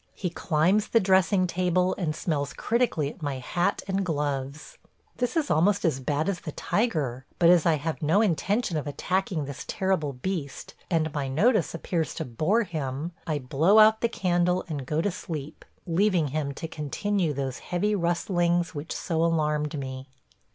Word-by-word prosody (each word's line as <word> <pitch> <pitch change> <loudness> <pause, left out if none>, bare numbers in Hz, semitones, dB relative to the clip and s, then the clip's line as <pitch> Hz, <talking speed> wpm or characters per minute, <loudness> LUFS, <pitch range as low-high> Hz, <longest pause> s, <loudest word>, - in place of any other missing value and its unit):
He 180 -3 -3
climbs 180 +6 +1
the 230 - +4
dressing 190 -1 +3
table 180 +1 +1
and 160 -5 -2
smells 145 -4 -2
critically 220 - 0
at - - -17
my 145 -3 -2
hat 175 +9 -1
and 195 0 0
gloves.... 145 -3 -3 0.4
This 245 +5 -1
is 310 -3 0
almost 200 +6 +3
as 150 -5 +1
bad 145 +5 -1
as 195 -3 -1
the 155 - -7
tiger, 145 - -1
but 170 -1 +5
as 175 -2 +4
I 165 - +4
have 155 +2 -4
no 160 +6 +3
intention 195 - +1
of 150 - -3
attacking 180 +1 -1
this 140 -1 -7
terrible 185 -7 0
beast 140 0 -5 0.2
and 160 -3 0
my 145 -2 -2
notice 210 - +2
appears 165 -5 -2
to - - -3
bore 155 - +1
him, 155 -3 -4 0.2
I 155 -2 0
blow 145 +9 +3
out 220 0 +7
the 235 - +2
candle 180 -3 +1
and 145 -6 -5
go 155 +2 0
to 205 - 0
sleep, 155 -6 -7 0.2
leaving 175 -3 +2
him 145 0 -2
to 165 - -5
continue 165 +4 -1
those 135 -2 -3
heavy 195 +4 -1
rustlings 175 -1 +1
which 150 +2 -5
so 165 -1 -1
alarmed 150 -2 0
me. 130 -1 -6
165 Hz, 170 wpm, -26 LUFS, 145-190 Hz, 0.4 s, out